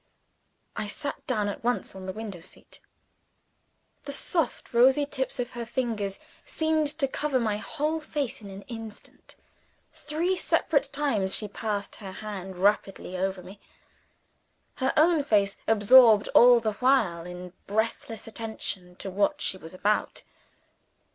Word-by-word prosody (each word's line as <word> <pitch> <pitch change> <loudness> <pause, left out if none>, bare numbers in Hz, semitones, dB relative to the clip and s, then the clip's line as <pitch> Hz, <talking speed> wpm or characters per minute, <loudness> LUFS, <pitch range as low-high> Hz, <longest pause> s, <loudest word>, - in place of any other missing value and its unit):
I 215 -1 -3
sat 285 +7 -6
down 215 -5 0
at 205 - -5
once 245 +1 -1
on 190 0 -8
the - - -2
window 205 -3 -7
seat. - - -11 1.3
The 280 - -5
soft 320 0 -2
rosy 260 +4 +5
tips 265 -2 -3
of 245 - -2
her 240 -1 -5
fingers 225 -5 -2 0.2
seemed 315 -1 0
to 275 -4 +1
cover 275 0 0
my 215 -3 0
whole 305 +8 -2
face 290 -6 -3
in 200 - -9
an 195 +1 -9
instant. 225 -5 -10 0.6
Three 330 +5 -1
separate 310 -4 +1
times 230 -10 +1
she 210 - 0
passed 205 -1 -4
her 195 -3 -8
hand 190 -3 -7
rapidly 195 -1 0
over 190 0 -2
me; 190 +3 -12 1.2
her 260 0 +1
own 320 0 +5
face 205 -7 +2
absorbed 220 0 +7
all 245 0 +7
the 220 -2 -1
while 215 -11 +2
in 180 0 -8
breathless 220 +1 -2
attention 215 -5 -5
to 195 - -6
what 200 +2 +1
she - - -2
was 165 -3 -11
about. 210 +3 0
220 Hz, 140 wpm, -27 LUFS, 195-265 Hz, 1.3 s, absorbed